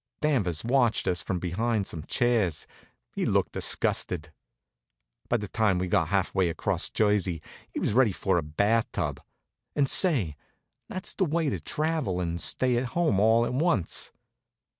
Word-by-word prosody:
Danvers 105 - 0
watched 120 -4 +2
us 90 -1 +1
from 95 - -2
behind 100 +5 -1
some 80 - -5
chairs. 115 - +1 0.5
He - - -2
looked - - +1
disgusted. - - 0 1.0
By 120 - +3
the 105 -2 -5
time 105 -3 +1
we'd 90 0 -2
got 80 - +2
half 95 +2 0
way 95 -3 +2
across 80 - 0
Jersey 100 -5 +1 0.4
we - - -2
was - - 0
ready 120 -2 +4
for 95 0 0
the - - +2
bath 100 +10 0
tub. 75 -7 -3 0.5
And 140 -2 +2
say, 130 - +3 0.5
that's 185 - -3
the 190 - +1
way 160 -2 0
to - - -3
travel 150 - -1
and 85 -1 -2
stay 125 -2 +2
at 125 - 0
home, 160 - +2
all 110 +3 +4
to - - -3
once. 130 - 0
105 Hz, 160 wpm, -27 LUFS, 90-125 Hz, 1.0 s, ready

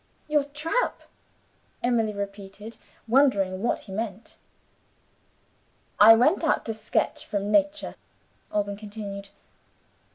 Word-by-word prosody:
"Your 300 -2 +2
trap?" 300 +12 -2 0.8
Emily 235 -3 +2
repeated, 200 +2 -7 0.3
wondering 210 -7 +3
what 235 - 0
he 195 - -12
meant. 215 +1 -5 1.6
"I 225 +2 +10
went 295 +11 +3
out 320 - +1
to 225 - -2
sketch 215 0 -1
from 205 0 -3
Nature," 295 +2 +1 0.6
Alban 205 -1 -1
continued. 205 -2 -7
220 Hz, 100 wpm, -26 LUFS, 200-270 Hz, 1.6 s, I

